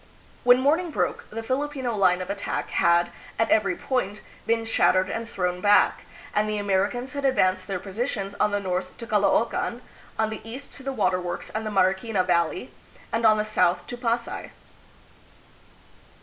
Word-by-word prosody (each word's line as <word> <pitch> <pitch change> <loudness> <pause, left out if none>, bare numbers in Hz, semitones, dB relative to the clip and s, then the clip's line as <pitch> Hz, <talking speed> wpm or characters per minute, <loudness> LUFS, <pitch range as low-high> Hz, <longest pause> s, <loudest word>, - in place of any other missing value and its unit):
When 245 +1 +6
morning 320 +6 +2
broke, 305 - -2
the 225 +1 -5
Filipino 260 -1 -2
line 185 -2 +3
of 180 - -5
attack 200 0 -3
had, 170 0 +3 0.3
at 225 0 +1
every 215 -4 +3
point, 210 -5 -2 0.3
been 230 0 +1
shattered 185 -4 +3
and 225 0 -4
thrown 180 -3 -2
back, 205 +1 +4 0.3
and 215 0 +1
the 210 - -1
Americans 205 +6 0
had 280 -1 -4
advanced 185 -9 +2
their 195 - -2
positions 200 +1 -3
on - - +3
the 205 0 0
north 185 -1 -3
to 230 - -7
Caloocan, 225 +3 +1 0.3
on 220 0 +1
the 220 - -6
east 250 +5 -9
to - - -10
the 270 +1 -3
Water 195 -7 +1
Works 175 -1 -5
and 220 0 -3
the - - -1
Mariquina 195 +1 +2
Valley, 175 +5 0 0.4
and 225 0 +3
on 215 0 +5
the 210 - 0
south 180 -4 +1
to 245 - -6
Pasay. 235 -1 -2
215 Hz, 170 wpm, -25 LUFS, 185-240 Hz, 0.4 s, When